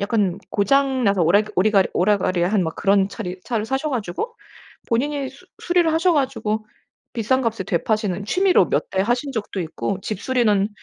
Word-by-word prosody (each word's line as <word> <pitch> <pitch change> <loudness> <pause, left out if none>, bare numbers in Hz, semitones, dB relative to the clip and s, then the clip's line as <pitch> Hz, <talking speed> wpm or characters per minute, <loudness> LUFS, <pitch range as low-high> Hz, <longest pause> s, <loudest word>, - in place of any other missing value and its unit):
약간 200 -3 0
고장 265 +5 +2
나서 200 -3 +3
오랙그 200 +6 +3
오리가리 195 0 +3
오라가리한 185 0 +1
그런 195 -1 +2
차리 180 -2 -6
차를 225 -4 -2
사셔 265 +6 -2
가지고 245 - -4 0.5
본인이 275 +3 -1
수 280 +7 -18 0.2
수리를 350 -2 +2
하셔 340 +2 +3
가지고 230 -7 -1 0.5
비싼 255 +3 +1
값에 225 -4 -1
되파시는 200 +1 -1
취미로 365 - +3
몇 - - -1
대 190 - 0
하신 245 +6 -1
적도 215 -4 -4
있고 180 +3 -3
집 210 -1 -4
수리는 220 -6 +2
215 Hz, 355 characters per minute, -21 LUFS, 195-265 Hz, 0.5 s, 나서